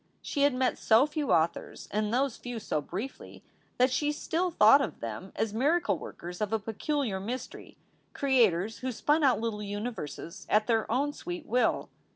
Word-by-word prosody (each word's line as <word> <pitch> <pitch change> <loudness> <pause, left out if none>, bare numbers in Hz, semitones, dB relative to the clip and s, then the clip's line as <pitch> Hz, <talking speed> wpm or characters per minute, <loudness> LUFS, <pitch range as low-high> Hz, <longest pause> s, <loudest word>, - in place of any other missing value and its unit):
She 285 - -2
had 285 -2 +4
met 255 0 0
so 225 +4 +5
few 300 -1 -2
authors, 165 0 0
and 210 0 0
those 255 0 +1
few 245 -2 -6
so 155 -7 -2
briefly, 200 - -7 0.3
that 255 +1 +4
she 295 +3 +1
still 335 +4 -1
thought 275 -2 +6
of - - -4
them 115 - -6
as 220 -2 -1
miracle 275 - +2
workers 175 +2 -8
of 210 -1 -1
a 225 - +2
peculiar 225 +1 -2
mystery, 240 +7 -6 0.3
creators 225 -7 +2
who 260 0 -3
spun 295 +6 +1
out 255 -6 +4
little 220 -2 -3
universes 205 - -6
at 215 0 +3
their 225 -2 +1
own 285 +4 +1
sweet 350 -1 -6
will. 250 -4 +1
235 Hz, 175 wpm, -29 LUFS, 210-280 Hz, 0.3 s, thought